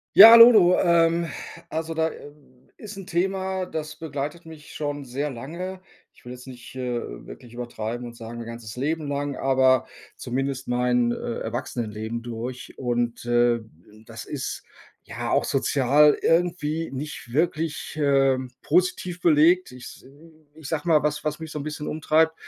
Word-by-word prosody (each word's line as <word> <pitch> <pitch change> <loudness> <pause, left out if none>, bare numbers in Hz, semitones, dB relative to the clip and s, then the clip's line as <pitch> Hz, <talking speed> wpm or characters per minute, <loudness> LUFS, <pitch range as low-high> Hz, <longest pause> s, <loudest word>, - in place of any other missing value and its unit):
Ja. 225 - +12
Hallo, 230 -6 +8
ähm, 170 0 +3 0.4
also, 160 +1 -3
da, 160 0 0
ähm, 145 -3 -16
ist 210 -2 -10
'n 195 -2 -9
Thema, 190 +1 -1
das 155 -2 -6
begleitet 150 +1 -5
mich 160 -2 -12
schon 145 -1 -4
sehr 135 +4 -3
lange. 170 +9 -7 0.3
Ich - - -24
will 125 - -7
jetzt 125 +1 -12
nicht, 125 -1 -11
äh, 125 -2 -2 0.3
wirklich 120 - -12
übertreiben 120 0 -5
und 120 - -8
sagen 115 +1 -8
mein 120 - -6
ganzes 115 -2 -8
Leben 150 +4 -2
lang, 140 -1 -3
aber 130 -1 +3 0.3
zumindest 135 +1 -3
mein, 125 -1 +1
äh, 120 - -4
Erwachsenenleben 115 -1 -4
durch 120 +2 -6
und, 120 -2 -2
äh, 120 0 +3 0.5
das - - -9
ist, - - -5 0.4
ja, - - -5
auch - - +2
sozial 145 +2 +3
irgendwie 165 -2 0
nicht 135 -3 -7
wirklich, 155 +1 -1
ähm, 135 -2 +2
positiv 180 +1 0
belegt. 170 +1 +4
Ich 125 0 -11
s - - -12 0.5
ich 155 -3 -10
sage 160 +1 -3
mal, 155 -2 +5
was 150 0 -1
was 150 0 -2
mich 160 -1 -8
so 150 - -5
'n - - -5
bisschen 150 0 -5
umtreibt. 160 +1 +2
145 Hz, 160 wpm, -24 LUFS, 125-165 Hz, 0.5 s, Ja